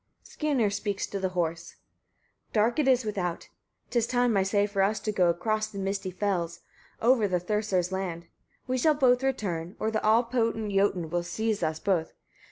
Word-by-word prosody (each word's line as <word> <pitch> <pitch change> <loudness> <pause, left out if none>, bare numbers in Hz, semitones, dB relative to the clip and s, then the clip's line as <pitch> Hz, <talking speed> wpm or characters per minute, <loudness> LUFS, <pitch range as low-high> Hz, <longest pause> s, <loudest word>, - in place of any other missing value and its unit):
Skirnir 270 -9 0
Speaks 200 -1 -2
to 200 - -5
the 190 -1 0
Horse. 170 0 -2 0.8
10. 210 - +4
Dark 240 +7 +1
it 290 - +2
is 255 -3 +4
without, 185 -5 -3 0.4
'tis 235 -2 +1
time, 245 -2 +2
I 195 - +4
say, 200 +1 +2
for 200 -1 -1
us 210 +2 +2
to 215 - -2
go 180 -4 +3
across 215 +5 0
the 215 -2 -10
misty 195 0 -2
fells, 180 -3 -2 0.4
over 235 -3 +4
the 180 -2 0
Thursar's 185 -1 -1
land: 180 -3 -3 0.4
we 255 0 -1
shall 305 +4 +4
both 250 -3 +4
return, 195 -10 -2
or 220 - 0
the 220 - -1
all 220 +3 +5
potent 230 -3 -1
Jotun 195 -5 +1
will 175 0 +1
seize 215 +5 -2
us 155 -1 -1
both. 175 -5 0
205 Hz, 185 wpm, -28 LUFS, 180-225 Hz, 0.8 s, all